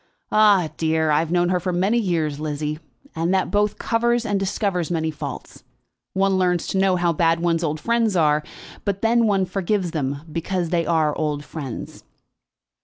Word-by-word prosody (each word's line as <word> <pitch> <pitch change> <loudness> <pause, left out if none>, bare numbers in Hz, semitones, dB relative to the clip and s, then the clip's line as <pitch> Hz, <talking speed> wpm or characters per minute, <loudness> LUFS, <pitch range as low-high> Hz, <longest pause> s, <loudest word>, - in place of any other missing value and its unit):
"Ah, 205 -6 +5
dear! 160 -1 +1
I 150 - +4
have 160 0 -1
known 175 0 +2
her 180 0 +1
for 180 +1 -2
many 195 +7 +1
years, 160 -8 -1
Lizzie, 150 0 -3 0.4
and 165 +2 0
that 190 - 0
both 205 0 +1
covers 235 +1 +1
and 205 -3 0
discovers 195 -3 -1
many 160 -2 -1
faults. 150 - -8 0.5
One 195 0 +2
learns 180 -2 +1
to 190 - 0
know 190 -1 +3
how 175 -1 +1
bad 165 +1 +2
one's 170 0 0
old 155 -1 -1
friends 230 0 +1
are, 150 -3 +3 0.4
but 200 0 -2
then 230 0 +3
one 195 -2 +2
forgives 190 -1 -1
them, 140 -2 -2
because 170 +1 -2
they 170 -3 +1
are 155 -3 +2
old 150 -2 -2
friends." 140 -7 -7
175 Hz, 180 wpm, -22 LUFS, 160-195 Hz, 0.5 s, Ah